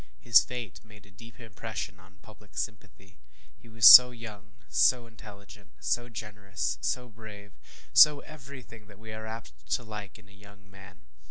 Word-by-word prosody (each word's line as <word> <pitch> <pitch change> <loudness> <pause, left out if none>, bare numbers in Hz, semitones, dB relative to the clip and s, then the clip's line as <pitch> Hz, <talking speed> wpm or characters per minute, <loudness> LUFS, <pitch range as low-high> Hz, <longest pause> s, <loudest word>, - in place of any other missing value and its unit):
His 115 +3 +4
fate 120 -6 -9
made 105 -2 -19
a 100 - -21
deep 115 +6 -17
impression 110 -3 -9
on 95 +1 -22
public 105 -3 -19
sympathy. 95 -2 -9 0.4
He 115 - -21
was 110 -1 0
so 125 0 +10
young 105 -4 -13
so 125 -2 +1
intelligent 105 - -16
so 120 - -3
generous 100 - -6
so 125 - -3
brave 105 -3 -14 0.4
so 150 -1 +6
every 140 -4 -13
thing 110 -2 -17
that 100 -1 -18
we 110 0 -12
are 110 0 -9
apt 110 - -12
to 125 - -2
like 105 -3 -10
in 105 -2 -22
a - - -23
young 100 +1 -20
man. 95 -1 -17
105 Hz, 170 wpm, -27 LUFS, 100-115 Hz, 0.4 s, so